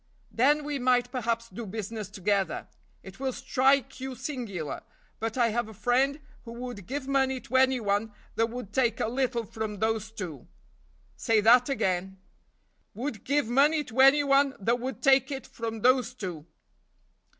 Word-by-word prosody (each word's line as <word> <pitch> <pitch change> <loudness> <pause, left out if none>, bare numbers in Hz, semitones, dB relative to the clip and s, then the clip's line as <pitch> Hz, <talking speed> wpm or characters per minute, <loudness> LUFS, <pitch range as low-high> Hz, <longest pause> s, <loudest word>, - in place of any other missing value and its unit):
"Then 290 +5 +3
we 290 -1 -3
might 245 -1 +2
perhaps 230 -2 -2
do 235 0 -8
business 215 0 -5
together; 200 0 -1 0.4
it 190 +3 -12
will 265 -1 -1
strike 270 +1 +1
you 265 0 -5
singular, 235 - -5 0.4
but 225 +2 -3
I 235 -2 +3
have 235 0 -2
a 220 - -12
friend 265 +6 +1 0.2
who 230 - -9
would 240 -5 -7
give 270 +1 -4
money 265 -1 +1
to 260 +3 -1
any 260 -1 +4
one 205 0 0 0.2
that 225 - +1
would 230 -4 -7
take 240 -4 +1
a - - 0
little 245 -1 -1
from 215 0 -5
those 220 0 -1
two." 175 - -7 0.7
"Say 225 -1 +2
that 245 +4 +6
again." 190 -6 -1 0.8
"Would 240 -2 -4
give 285 +1 +1
money 290 +5 +3
to 255 -2 -7
any 275 +2 +7
one 275 0 +3
that 235 +5 +1
would 260 +2 -5
take 270 -2 +5
it 270 -2 -5
from 225 -1 -6
those 250 0 +3
two." 175 -8 -6
240 Hz, 165 wpm, -28 LUFS, 220-265 Hz, 0.8 s, any